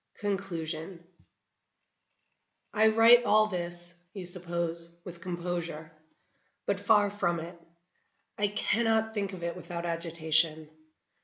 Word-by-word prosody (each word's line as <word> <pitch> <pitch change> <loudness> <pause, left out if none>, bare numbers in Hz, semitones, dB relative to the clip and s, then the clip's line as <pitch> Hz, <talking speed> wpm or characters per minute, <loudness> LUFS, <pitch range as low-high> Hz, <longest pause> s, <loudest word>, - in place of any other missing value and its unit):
Conclusion 170 -4 -4 1.7
I 220 0 +5
write 225 +2 +7
all 215 -2 +5
this 175 -3 -5 0.2
you 190 -2 -5
suppose 170 -1 -3 0.2
with 175 -1 -9
composure. 170 -3 -4 0.7
But 200 -1 0
far 205 0 +4
from 175 -4 0
it; 170 +1 -9 0.7
I 205 - +1
cannot 220 +1 +1
think 200 -2 -2
of 180 -3 -8
it 170 0 -2
without 175 -1 -6
agitation. 160 -2 0
175 Hz, 105 wpm, -30 LUFS, 170-205 Hz, 1.7 s, write